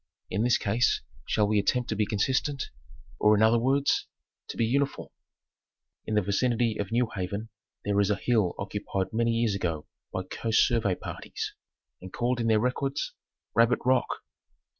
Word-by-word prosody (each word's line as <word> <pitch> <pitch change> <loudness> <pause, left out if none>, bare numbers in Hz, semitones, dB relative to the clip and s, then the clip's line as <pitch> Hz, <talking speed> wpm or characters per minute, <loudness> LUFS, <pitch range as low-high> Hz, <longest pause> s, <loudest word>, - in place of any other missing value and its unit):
In 100 - 0
this 120 +1 +4
case 110 +1 +1 0.3
shall 105 -1 +2
we 105 0 +3
attempt 125 +5 +1
to 110 - 0
be 105 0 +1
consistent, 130 +7 0 0.5
or 105 0 +5
in 105 - +4
other 115 +1 +5
words 135 +4 +2 0.4
to - - -7
be 115 - +2
uni 140 +5 +2
form?; - - -10 1.0
In 110 - -1
the 105 - +3
vicinity 115 +3 +1
of 100 +1 -3
New 120 +1 +2
Haven 100 +4 -4 0.4
there 100 0 +2
is 100 - +3
a 105 - +3
hill 110 -7 +1
occupied 95 -1 -3
many 115 +1 +2
years 115 -2 +1
ago 80 -6 -2 0.3
by 95 - -2
Coast 110 +4 +2
Survey 110 -6 +1
parties, - - -6 0.5
and 95 0 -9
called 120 +1 0
in 115 - 0
their 110 -1 +4
records 135 +4 -1 0.4
Rabbit 115 +2 +4
Rock. 130 0 +3
110 Hz, 170 wpm, -28 LUFS, 100-120 Hz, 1.0 s, or